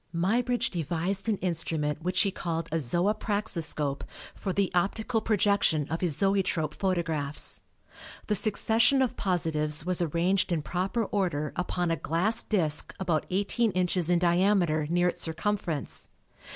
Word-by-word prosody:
Muybridge 235 Hz, +8 st, +1 dB
devised 180 Hz, +5 st, -2 dB
an 210 Hz, -, +1 dB
instrument 160 Hz, -3 st, -1 dB
which 180 Hz, +2 st, 0 dB
he 200 Hz, -, +2 dB
called 165 Hz, -2 st, -3 dB
a 165 Hz, -, +1 dB
Zoopraxiscope 175 Hz, -, -1 dB, 0.3 s
for 195 Hz, -, -4 dB
the 195 Hz, 0 st, 0 dB
optical 220 Hz, +5 st, 0 dB
projection 200 Hz, -8 st, +2 dB
of 165 Hz, -, -2 dB
his 170 Hz, -6 st, +1 dB
zoetrope 195 Hz, -6 st, +1 dB
photographs. 165 Hz, -6 st, 0 dB, 0.6 s
The 215 Hz, -, 0 dB
succession 225 Hz, +6 st, +4 dB
of 255 Hz, -, -2 dB
positives 155 Hz, -4 st, 0 dB
was 180 Hz, -1 st, 0 dB
arranged 175 Hz, +4 st, +1 dB
in 160 Hz, -3 st, 0 dB
proper 190 Hz, +8 st, -1 dB
order 175 Hz, -8 st, -1 dB
upon 180 Hz, -1 st, -1 dB
a 165 Hz, -, 0 dB
glass 175 Hz, +10 st, 0 dB
disk 160 Hz, -8 st, 0 dB
about 170 Hz, -5 st, -1 dB
18 205 Hz, +3 st, 0 dB
inches 180 Hz, -1 st, 0 dB
in 175 Hz, -, +4 dB
diameter 175 Hz, -3 st, +2 dB
near 175 Hz, +1 st, +2 dB
its -, -, -2 dB
circumference. 170 Hz, -2 st, -1 dB
180 Hz, 140 wpm, -28 LUFS, 160-200 Hz, 0.6 s, succession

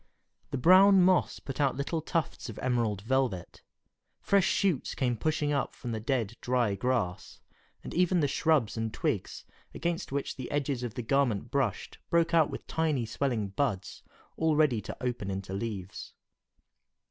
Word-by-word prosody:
The -, -, -3 dB
brown 185 Hz, +6 st, +7 dB
moss 185 Hz, -1 st, +3 dB
put 135 Hz, +1 st, -5 dB
out 140 Hz, -2 st, +2 dB
little 155 Hz, +4 st, -2 dB
tufts 160 Hz, -4 st, -2 dB
of 110 Hz, -, -8 dB
emerald 115 Hz, -6 st, 0 dB
velvet, 120 Hz, -7 st, -1 dB, 0.6 s
fresh 200 Hz, -2 st, +3 dB
shoots 185 Hz, -9 st, 0 dB
came 125 Hz, -2 st, 0 dB
pushing 150 Hz, +3 st, 0 dB
up 140 Hz, -, -1 dB
from 120 Hz, -, -6 dB
the 110 Hz, -, -2 dB
dead, 115 Hz, -2 st, -1 dB
dry 125 Hz, -4 st, +1 dB
grass, 100 Hz, -4 st, -2 dB, 0.4 s
and -, -, -7 dB
even 180 Hz, +1 st, +3 dB
the 145 Hz, -, +2 dB
shrubs 140 Hz, -6 st, +1 dB
and 115 Hz, -1 st, -2 dB
twigs -, -, -3 dB, 0.3 s
against 170 Hz, -1 st, -2 dB
which 140 Hz, 0 st, -3 dB
the 130 Hz, -, -6 dB
edges 140 Hz, -3 st, -1 dB
of 120 Hz, -1 st, -5 dB
the 125 Hz, -, -4 dB
garment 120 Hz, -3 st, +1 dB
brushed 135 Hz, -8 st, -1 dB
broke 170 Hz, 0 st, +2 dB
out 160 Hz, -3 st, +5 dB
with -, -, -7 dB
tiny 155 Hz, -7 st, 0 dB
swelling 115 Hz, -3 st, -1 dB
buds, 100 Hz, -3 st, -2 dB, 0.4 s
all 160 Hz, -1 st, +2 dB
ready 145 Hz, -8 st, +3 dB
to -, -, -7 dB
open 120 Hz, -5 st, -2 dB
into 95 Hz, 0 st, -4 dB
leaves. 100 Hz, -3 st, -5 dB
130 Hz, 160 wpm, -29 LUFS, 110-155 Hz, 0.6 s, brown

